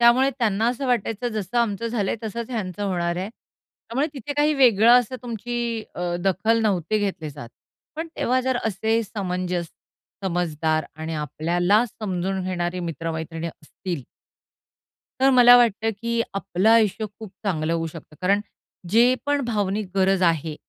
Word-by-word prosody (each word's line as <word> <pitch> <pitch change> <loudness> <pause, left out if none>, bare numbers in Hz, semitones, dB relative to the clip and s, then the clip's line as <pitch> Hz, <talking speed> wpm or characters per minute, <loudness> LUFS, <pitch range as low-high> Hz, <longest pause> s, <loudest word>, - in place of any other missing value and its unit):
त्यामुळे 245 +3 +5
त्यांना 220 -2 +1
असं 250 +3 -2
वाटायचं, 240 -1 0
जसं 215 0 -2
आमचं 230 -1 0
झालंय 225 -4 -1
तसंच 230 +2 -5
ह्यांचं 205 -4 -3
होणार 175 -3 -1
आहे. 185 +3 -3
त्यामुळे 255 +4 -6
तिथे 275 +1 -5
काही 295 +1 +2
वेगळं 235 -5 +5
असं 250 +2 -6
तुमची 235 0 -3
अ, 175 0 -2
दखल 220 +4 +2
नव्हते 200 -1 +1
घेतले 190 -7 -3
जात. 140 -5 -9 0.5
पण 325 +1 -4
तेव्हा 255 +1 +1
जर 260 -1 0
असे 220 +2 +1
समंजस, 180 -4 -3 0.6
समजदार 160 -3 0
आणि 160 +1 -4
आपल्याला 175 - +1
समजून 190 -4 -3
घेणारी 180 -1 -2
मित्र-मैत्रिणी 165 0 -4
असतील 165 0 -7 1.2
तर 270 +1 +5
मला 245 -1 +8
वाटतं, 225 -2 +3
की 235 +3 -2
आपलं 195 +1 0
आयुष्य 220 -1 +3
खूप 220 -3 -9
चांगलं 165 -5 0
होऊ 165 -1 -1
शकतं. 160 -1 -11
कारण, 195 +3 +3 0.5
जे 240 +4 +5
पण 290 0 +2
भावनिक 205 -3 -1
गरज 190 0 +3
आहे 165 -3 +1
200 Hz, 145 wpm, -23 LUFS, 175-235 Hz, 1.2 s, मला